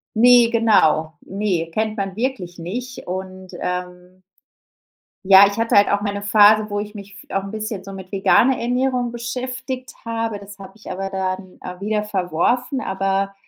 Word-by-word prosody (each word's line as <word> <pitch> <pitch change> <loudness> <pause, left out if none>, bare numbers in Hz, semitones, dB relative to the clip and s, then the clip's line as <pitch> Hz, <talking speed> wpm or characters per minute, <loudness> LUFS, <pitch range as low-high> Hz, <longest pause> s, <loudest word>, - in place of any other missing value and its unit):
Ne, 240 +1 +6
genau, 160 -9 +3
ne, 190 -4 -2
kennt 215 +1 -1
man 195 -2 -3
wirklich 220 -9 -3
nicht 245 +9 -6
und, 185 0 -6
ähm 180 0 -5 1.0
Ja, 195 +1 +8
ich 200 - -5
hatte 230 0 +1
halt 205 - +6
auch 205 - +1
mal 205 -1 -2
'ne 200 - -4
Phase, 210 +1 +5
wo 205 0 -2
ich 210 0 -6
mich 200 -1 -11
f - - -29
auch 195 - 0
'n 195 - -7
bisschen 215 -2 -5
so 195 - -9
mit 190 -1 -10
veganer 215 +6 +3
Ernährung 250 0 0
beschäftigt 255 +1 -5
habe, 225 -2 -3
das 200 0 -13
habe 195 -1 -11
ich 215 - -12
aber 195 +1 -4
dann, 190 -1 -4
äh, 180 0 -8
wieder 210 +1 -1
verworfen, 210 - -1
aber 195 0 -1
205 Hz, 175 wpm, -21 LUFS, 190-230 Hz, 1.0 s, Ja